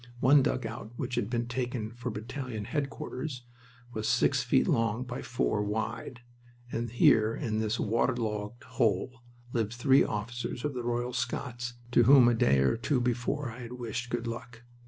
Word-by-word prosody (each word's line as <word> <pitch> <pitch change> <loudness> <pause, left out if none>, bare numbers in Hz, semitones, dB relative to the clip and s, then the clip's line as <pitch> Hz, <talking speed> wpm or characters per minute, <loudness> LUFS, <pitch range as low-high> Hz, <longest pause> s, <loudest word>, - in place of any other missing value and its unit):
One 140 +3 +6
dugout 130 -4 -3
which 125 - -4
had 105 - 0
been 120 -1 -1
taken 120 -3 -3
for 120 +1 -5
battalion 115 0 -5
headquarters 140 -1 -4 0.5
was 110 0 -2
six - - +3
feet - - +2
long 115 +1 +1
by 125 +1 -5
four 115 -3 0
wide, 110 +3 -3 0.5
and 115 +1 -2
here 110 -1 +4
in 110 -6 -2
this 110 +1 -1
waterlogged 115 0 -1
hole 120 0 0 0.3
lived 115 -2 0
three 135 +3 +5
officers 120 +4 -4
of 150 - -1
the 125 - -3
Royal 120 +1 -2
Scots 125 -1 -3 0.2
to 120 -1 +5
whom 130 -1 +8
a 120 - +5
day 70 - +3
or 65 - +2
two 120 +4 +1
before 125 +2 -1
I 120 - -10
had 120 0 -7
wished 120 0 -4
"good 120 -1 -2
luck." 115 0 -7
120 Hz, 165 wpm, -30 LUFS, 110-125 Hz, 0.5 s, whom